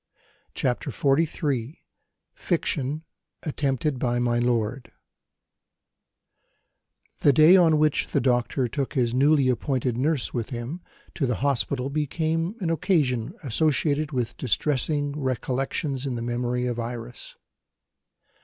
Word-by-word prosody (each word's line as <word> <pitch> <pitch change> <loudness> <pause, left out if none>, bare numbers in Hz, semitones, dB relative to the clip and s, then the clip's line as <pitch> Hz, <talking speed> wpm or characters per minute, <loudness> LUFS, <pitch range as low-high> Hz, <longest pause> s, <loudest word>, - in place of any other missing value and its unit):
CHAPTER 125 -2 -1
XLIII 145 -3 0 0.5
FICTION: 155 -3 -1 0.4
ATTEMPTED 140 -2 -1
BY 120 -1 0
MY 120 -1 +1
LORD 120 +1 -1 2.3
THE 145 - +5
day 155 +6 +7
on 165 -4 +5
which 150 -1 +2
the - - 0
doctor 125 +1 +1
took 135 +3 -3
his 120 -3 +1
newly 140 +1 +4
appointed 125 -1 0
nurse 145 -1 0
with 115 -3 -3
him 125 +8 -5 0.3
to 135 - -1
the 125 - 0
hospital 135 0 0
became 160 +5 -1
an 170 -3 0
occasion 145 - +1
associated 150 +3 +1
with 120 -3 -2
distressing 145 +4 0
recollections 135 +1 -2
in 130 - -2
the 115 - -4
memory 120 +1 -1
of 120 -1 -2
Iris. 120 +1 -6
135 Hz, 115 wpm, -25 LUFS, 120-150 Hz, 2.3 s, day